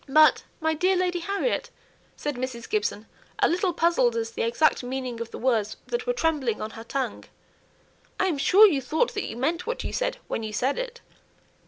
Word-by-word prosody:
"But, 310 Hz, +2 st, +6 dB, 0.2 s
my 320 Hz, -1 st, +1 dB
dear 365 Hz, +4 st, +2 dB
Lady 360 Hz, -1 st, 0 dB
Harriet," 400 Hz, +7 st, -1 dB, 0.5 s
said 295 Hz, -, -2 dB
Mrs. 245 Hz, -2 st, -5 dB
Gibson, 210 Hz, 0 st, -1 dB, 0.3 s
a -, -, +4 dB
little 360 Hz, +2 st, +1 dB
puzzled 320 Hz, -9 st, +2 dB
as 225 Hz, 0 st, -1 dB
to 230 Hz, -, -21 dB
the -, -, 0 dB
exact 235 Hz, +7 st, +2 dB
meaning 250 Hz, -2 st, -4 dB
of 230 Hz, -, -4 dB
the -, -, -8 dB
words 225 Hz, -5 st, 0 dB
that 480 Hz, 0 st, -3 dB
were -, -, +2 dB
trembling 300 Hz, -, 0 dB
on 215 Hz, -, -4 dB
her 225 Hz, -, -9 dB
tongue, 265 Hz, +3 st, -3 dB, 0.9 s
"I -, -, +3 dB
am 330 Hz, -7 st, 0 dB
sure 395 Hz, +9 st, +7 dB
you 305 Hz, -10 st, +3 dB
thought 315 Hz, -, 0 dB
that 410 Hz, -, -3 dB
you -, -, -7 dB
meant 330 Hz, -, -1 dB
what 485 Hz, -, -2 dB
you -, -, -4 dB
said, -, -, -1 dB
when -, -, -2 dB
you 215 Hz, -1 st, -5 dB
said 255 Hz, +6 st, 0 dB
it." 485 Hz, -1 st, -5 dB
295 Hz, 205 wpm, -26 LUFS, 235-365 Hz, 0.9 s, sure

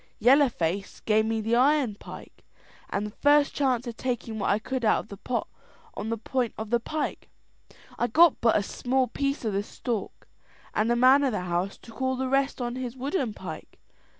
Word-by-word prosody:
"Yellow 270 Hz, +5 st, +5 dB
Face 190 Hz, 0 st, -3 dB
gave 220 Hz, 0 st, +2 dB
me 225 Hz, 0 st, 0 dB
the 225 Hz, +2 st, +1 dB
iron 265 Hz, -2 st, +3 dB
pike, 200 Hz, -, -12 dB, 0.5 s
and 205 Hz, -, -2 dB
the 210 Hz, -, -6 dB
first 290 Hz, +4 st, +3 dB
chance 255 Hz, -4 st, +1 dB
of 235 Hz, -2 st, -6 dB
taking 240 Hz, -3 st, -3 dB
what 200 Hz, -, 0 dB
I 200 Hz, -, +3 dB
could 255 Hz, +3 st, -4 dB
out 215 Hz, -, +4 dB
of -, -, -20 dB
the 200 Hz, -, -8 dB
pot 240 Hz, +4 st, -3 dB, 0.5 s
on 220 Hz, -, -5 dB
the 230 Hz, -, -1 dB
point 245 Hz, +1 st, -2 dB
of 220 Hz, 0 st, -6 dB
the 235 Hz, -, +3 dB
pike. 305 Hz, +6 st, -4 dB, 0.7 s
I 240 Hz, -, +2 dB
got 320 Hz, +7 st, +5 dB
but 230 Hz, -, +4 dB
a 205 Hz, -, 0 dB
small 255 Hz, +5 st, 0 dB
piece 275 Hz, +1 st, -2 dB
of 215 Hz, -, 0 dB
the 200 Hz, -, +1 dB
stork, 215 Hz, 0 st, -5 dB, 0.5 s
and 215 Hz, +2 st, +1 dB
the 240 Hz, -, +3 dB
man 260 Hz, +4 st, +6 dB
of 265 Hz, -4 st, +1 dB
the 210 Hz, -, -1 dB
house 180 Hz, +2 st, -2 dB
took 230 Hz, +2 st, -13 dB
all 260 Hz, 0 st, +1 dB
the 260 Hz, +1 st, -2 dB
rest 275 Hz, +1 st, +1 dB
on 240 Hz, 0 st, -3 dB
his 255 Hz, -1 st, -5 dB
wooden 265 Hz, -, -2 dB
pike. 170 Hz, -4 st, -9 dB
240 Hz, 205 wpm, -27 LUFS, 215-265 Hz, 0.7 s, man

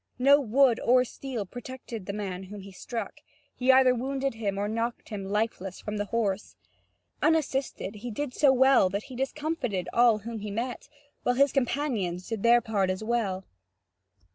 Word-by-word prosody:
No 275 Hz, +3 st, +6 dB
wood 255 Hz, 0 st, +3 dB
or 250 Hz, +1 st, +4 dB
steel 250 Hz, -4 st, -5 dB
protected 245 Hz, -2 st, -8 dB
the -, -, -1 dB
man 195 Hz, -2 st, -5 dB
whom 205 Hz, +1 st, -9 dB
he 195 Hz, +1 st, -11 dB
struck; 225 Hz, +5 st, -6 dB, 0.4 s
he 255 Hz, +1 st, +3 dB
either 260 Hz, -1 st, +6 dB
wounded 270 Hz, +2 st, -2 dB
him 205 Hz, -3 st, -3 dB
or 205 Hz, +1 st, -1 dB
knocked 230 Hz, +2 st, -3 dB
him 200 Hz, -3 st, -5 dB
lifeless 200 Hz, -2 st, -2 dB
from 210 Hz, 0 st, -5 dB
the 205 Hz, -, -1 dB
horse. 205 Hz, -2 st, -2 dB, 0.7 s
Unassisted, 275 Hz, -9 st, 0 dB
he 240 Hz, +4 st, -6 dB
did 255 Hz, +4 st, -4 dB
so 285 Hz, -1 st, +5 dB
well 265 Hz, -6 st, +5 dB
that 200 Hz, +3 st, -3 dB
he 260 Hz, -, -10 dB
discomfited 270 Hz, -, -2 dB
all 235 Hz, -2 st, +5 dB
whom 225 Hz, +1 st, -6 dB
he 210 Hz, 0 st, -5 dB
met, 235 Hz, +4 st, -4 dB, 0.3 s
while 245 Hz, -, +1 dB
his 280 Hz, +1 st, +4 dB
companions 240 Hz, -10 st, -1 dB
did 225 Hz, -3 st, -3 dB
their 235 Hz, +2 st, +5 dB
part 205 Hz, -4 st, 0 dB
as 185 Hz, +3 st, -2 dB
well. 210 Hz, -5 st, -1 dB
230 Hz, 170 wpm, -28 LUFS, 200-260 Hz, 0.7 s, No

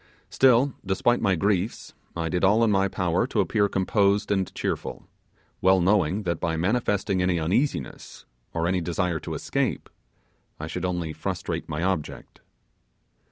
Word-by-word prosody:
Still, 130 Hz, +1 st, +4 dB
despite 100 Hz, +5 st, +1 dB
my 95 Hz, -4 st, +2 dB
griefs, 100 Hz, +4 st, -1 dB, 0.2 s
I 85 Hz, -1 st, -2 dB
did 90 Hz, +3 st, -1 dB
all 105 Hz, +4 st, +4 dB
in 110 Hz, -, +3 dB
my 95 Hz, -1 st, +3 dB
power 90 Hz, -3 st, 0 dB
to -, -, -2 dB
appear 100 Hz, -1 st, +2 dB
composed 100 Hz, +2 st, +1 dB
and 95 Hz, -3 st, 0 dB
cheerful, -, -, -4 dB, 0.5 s
well 95 Hz, 0 st, +5 dB
knowing 95 Hz, +1 st, +2 dB
that 85 Hz, -3 st, -2 dB
by 80 Hz, -1 st, -1 dB
manifesting 100 Hz, 0 st, 0 dB
any 90 Hz, -1 st, +1 dB
uneasiness, 85 Hz, -, -2 dB, 0.3 s
or 85 Hz, 0 st, -1 dB
any 90 Hz, +1 st, +1 dB
desire 85 Hz, 0 st, -1 dB
to -, -, -6 dB
escape, -, -, -2 dB, 0.7 s
I 75 Hz, -, -4 dB
should 90 Hz, +3 st, -4 dB
only 85 Hz, -3 st, -2 dB
frustrate -, -, -4 dB
my 75 Hz, +3 st, -3 dB
object. 95 Hz, -5 st, -3 dB
95 Hz, 150 wpm, -25 LUFS, 85-100 Hz, 0.7 s, well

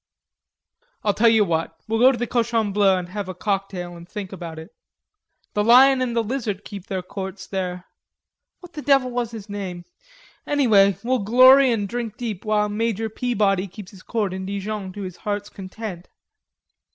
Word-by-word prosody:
"I'll 205 Hz, -, +2 dB
tell 230 Hz, +3 st, +4 dB
you 220 Hz, -2 st, +4 dB
what; 165 Hz, -1 st, -2 dB
we'll 225 Hz, 0 st, 0 dB
go 255 Hz, +2 st, +7 dB
to 255 Hz, -, -3 dB
the 240 Hz, -, -1 dB
Cochon 230 Hz, -3 st, 0 dB
Bleu 200 Hz, -2 st, +4 dB
and 180 Hz, -1 st, -5 dB
have 200 Hz, 0 st, -5 dB
a 185 Hz, -, -6 dB
cocktail 190 Hz, -2 st, -3 dB
and 170 Hz, +1 st, -13 dB
think 200 Hz, -3 st, -6 dB
about 170 Hz, -4 st, -7 dB
it." 160 Hz, +6 st, -10 dB, 0.8 s
"The 210 Hz, -, +1 dB
lion 255 Hz, +4 st, +6 dB
and 245 Hz, -2 st, -1 dB
the 230 Hz, -, +2 dB
lizard 210 Hz, -4 st, -3 dB
keep 200 Hz, -1 st, -9 dB
their 190 Hz, -3 st, -3 dB
courts 190 Hz, +1 st, -7 dB
where... 180 Hz, -2 st, -3 dB, 0.8 s
what 355 Hz, -1 st, -13 dB
the 300 Hz, -, -6 dB
devil 270 Hz, -3 st, +3 dB
was 240 Hz, -2 st, -2 dB
his 225 Hz, -3 st, -9 dB
name? 190 Hz, -4 st, -6 dB, 0.6 s
Anyway, 215 Hz, -9 st, +4 dB
we'll 255 Hz, +2 st, +1 dB
glory 255 Hz, +5 st, +6 dB
and 210 Hz, -3 st, -1 dB
drink 235 Hz, -1 st, -5 dB
deep, 220 Hz, -6 st, -5 dB
while 210 Hz, -1 st, +2 dB
Major 220 Hz, +1 st, -1 dB
Peabody 205 Hz, -5 st, 0 dB
keeps 195 Hz, 0 st, -11 dB
his 195 Hz, -3 st, -14 dB
court 210 Hz, -4 st, -2 dB
in 190 Hz, 0 st, -5 dB
Dijon 200 Hz, 0 st, -4 dB
to 205 Hz, -, -7 dB
his 185 Hz, -2 st, -7 dB
heart's 205 Hz, -1 st, -4 dB
content." 190 Hz, -1 st, -8 dB
205 Hz, 180 wpm, -23 LUFS, 190-235 Hz, 0.8 s, go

